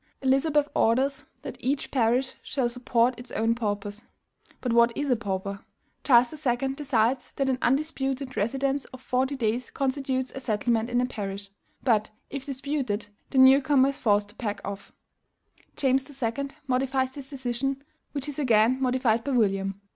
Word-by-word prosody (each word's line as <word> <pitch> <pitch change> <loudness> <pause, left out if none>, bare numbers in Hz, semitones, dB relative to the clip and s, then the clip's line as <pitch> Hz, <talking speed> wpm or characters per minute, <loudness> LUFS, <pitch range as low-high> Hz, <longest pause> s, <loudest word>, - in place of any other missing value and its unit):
Elizabeth 285 +3 +3
orders 270 +5 +2 0.2
that - - -7
each 275 +3 -1
parish 250 +1 +2
shall 260 -4 -1
support 245 0 +1
its 245 - -10
own 225 +1 +2
paupers. 205 -1 -3 0.5
But 245 -3 -1
what 235 0 +5
is 290 -2 0
a - - +5
pauper? 200 -2 -3 0.4
Charles 245 -1 +5
II. 250 0 +1
decides 260 -3 0
that 270 -1 0
an 255 - -1
UNDISPUTED 270 -1 -1
residence 270 +6 0
of 260 - -12
forty 260 +2 0
days 240 0 -1
constitutes 265 -1 -1
a - - -5
settlement 230 -1 0
in 245 0 +2
a - - +2
parish; 200 -4 -5 0.3
but, 220 -5 +2 0.2
if 275 0 -5
disputed, 265 -6 -2 0.2
the 270 - -3
new 265 +1 +8
comer 270 -1 +4
is 275 - -5
forced 205 -2 +2
to 210 - -12
pack 210 -4 -3
off. 200 0 -7 0.8
James 265 -1 +2
II. 270 0 -2 0.2
modifies 260 0 0
this 270 -1 -9
decision, 270 +1 -2 0.3
which 280 -1 -4
is 290 0 -5
again 240 -1 +3
modified 250 -3 +2
by 280 - -3
William. 195 -4 +1
255 Hz, 160 wpm, -27 LUFS, 230-270 Hz, 0.8 s, new